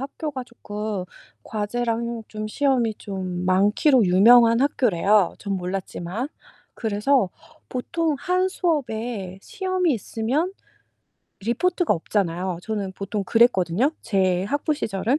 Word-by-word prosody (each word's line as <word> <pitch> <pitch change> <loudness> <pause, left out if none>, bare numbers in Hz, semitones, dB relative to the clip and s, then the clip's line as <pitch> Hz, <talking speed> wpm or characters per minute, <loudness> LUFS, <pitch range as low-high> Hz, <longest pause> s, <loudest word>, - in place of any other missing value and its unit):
학교가 275 -1 -5
쪼끔 210 -4 -5 0.4
과제랑 230 +2 -2
좀 215 0 -5
시험이 250 -3 +1
좀 185 -4 -5
많기로 205 +7 +4
유명한 230 +5 +6
학교래요 210 - +3
전 200 -1 -3
몰랐지만. 185 +5 -4 0.5
그래서 220 +1 +1 0.4
보통 310 +5 -1
1 365 +5 +1
수업에 235 - -2
시험이 370 -6 0
있으면 250 - -1 0.9
리포트가 330 - +1
없잖아요. 180 0 -1
저는 205 -4 -3
보통 200 +1 -4
그랬거든요 225 - +3
제 185 -3 +1
학부 290 +7 0
시절은. 230 0 -1
225 Hz, 255 characters per minute, -23 LUFS, 195-275 Hz, 0.9 s, 유명한